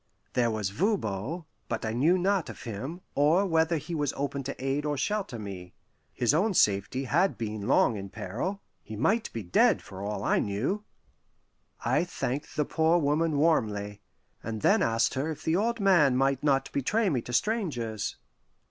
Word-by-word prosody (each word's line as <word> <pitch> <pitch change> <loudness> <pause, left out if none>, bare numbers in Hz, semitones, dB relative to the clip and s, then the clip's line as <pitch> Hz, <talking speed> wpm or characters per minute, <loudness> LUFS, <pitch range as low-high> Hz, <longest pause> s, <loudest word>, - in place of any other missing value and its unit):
There 120 -2 +2
was 105 -3 -2
Voban, 155 - -1 0.2
but 115 -1 -2
I 110 - -2
knew 155 +10 +3
not 190 -1 +1
of - - -9
him, 130 - -6
or 160 +7 +3
whether 165 -2 +2
he 160 +4 -6
was 145 -4 -1
open 140 0 -2
to 140 - -4
aid 135 +2 0
or 150 -1 -1
shelter 195 - -2
me. 95 -4 -8 0.4
His 120 +2 +1
own 190 +6 +2
safety 100 +5 +2
had 170 +9 +1
been 110 -2 -4
long 120 -4 +3
in 100 0 -6
peril; 155 - -4 0.2
he 110 - -8
might 210 - +1
be 115 - -5
dead, 90 - +3
for 95 0 -9
all 105 +1 -3
I - - +2
knew. 125 - -1 1.0
I 130 +7 +3
thanked 145 -5 -4
the 150 - +1
poor 160 +3 +2
woman 155 0 +1
warmly, 105 -10 +1 0.4
and 110 -1 -5
then - - +4
asked 115 0 +2
her 140 +4 -1
if 155 - -6
the 160 - +1
old 230 +4 0
man 170 -10 +4
might 135 0 +2
not 135 -2 +1
betray 205 - +1
me 135 -9 +1
to 120 - -8
strangers. 120 - -1
140 Hz, 175 wpm, -28 LUFS, 110-170 Hz, 1.0 s, then